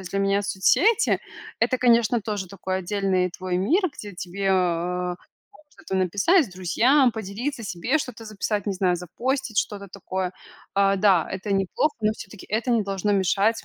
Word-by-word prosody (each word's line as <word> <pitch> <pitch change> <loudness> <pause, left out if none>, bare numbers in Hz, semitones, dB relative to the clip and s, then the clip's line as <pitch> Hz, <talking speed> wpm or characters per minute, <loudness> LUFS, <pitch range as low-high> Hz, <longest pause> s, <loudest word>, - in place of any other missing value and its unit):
есть 185 - -9
для 195 - -1
меня 195 +1 +2
соцсети 405 - +3 0.4
это, 255 - +2
конечно, 235 -1 +3
тоже 205 -3 -4
такой 190 0 -3
отдельный 190 -1 0
твой 185 0 -3
мир, 300 - +2
где 205 -3 -8
тебе, 190 +3 -4
э, - - +4
там 180 -1 0 0.5
что-то 190 - -7
написать 205 - +3
с - - -13
друзьям, 235 - +3
поделиться 225 +5 -4
себе, 205 - 0
что-то 250 -5 -6
записать, 210 -1 -3
не 200 - 0
знаю, 185 -1 +1
запостить 240 - -2
что-то 200 -1 -2
такое, 185 -1 -4 0.4
а, 195 0 +4
да, 190 -4 +3
это 190 +2 -3
неплохо, 195 +10 0
но 215 0 +2
всё-таки 200 -2 -11
это 225 +4 -1
не 230 -2 +3
должно 200 +1 -1
мешать 200 +3 +2
200 Hz, 165 wpm, -24 LUFS, 185-225 Hz, 0.5 s, э